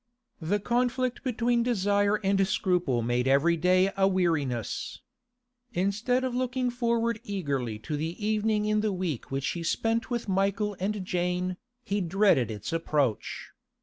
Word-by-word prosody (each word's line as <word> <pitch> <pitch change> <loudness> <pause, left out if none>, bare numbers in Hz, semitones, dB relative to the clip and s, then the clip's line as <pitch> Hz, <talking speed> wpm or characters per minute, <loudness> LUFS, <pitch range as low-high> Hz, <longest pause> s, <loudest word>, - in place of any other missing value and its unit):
The 190 +6 0
conflict 250 +3 0
between 240 -1 +1
desire 205 -3 +2
and 195 0 +2
scruple 175 - +1
made 120 +2 0
every 140 +6 +4
day 185 +3 +3
a 195 -1 +3
weariness. 160 - -1 0.7
Instead 215 +7 0
of 260 -1 -1
looking 250 0 -1
forward 235 -2 0
eagerly 140 - -2
to 155 - -2
the 160 +3 -3
evening 215 0 +1
in 215 0 +2
the 215 -1 0
week 180 -9 -3
which 135 0 -1
he 170 - -3
spent 225 +7 0
with 240 -3 -2
Michael 200 +2 0
and 195 0 -2
Jane, 180 0 -1 0.3
he 200 -2 -1
dreaded 180 - +3
its 105 - -5
approach. 145 -8 -1
195 Hz, 145 wpm, -28 LUFS, 165-225 Hz, 0.7 s, every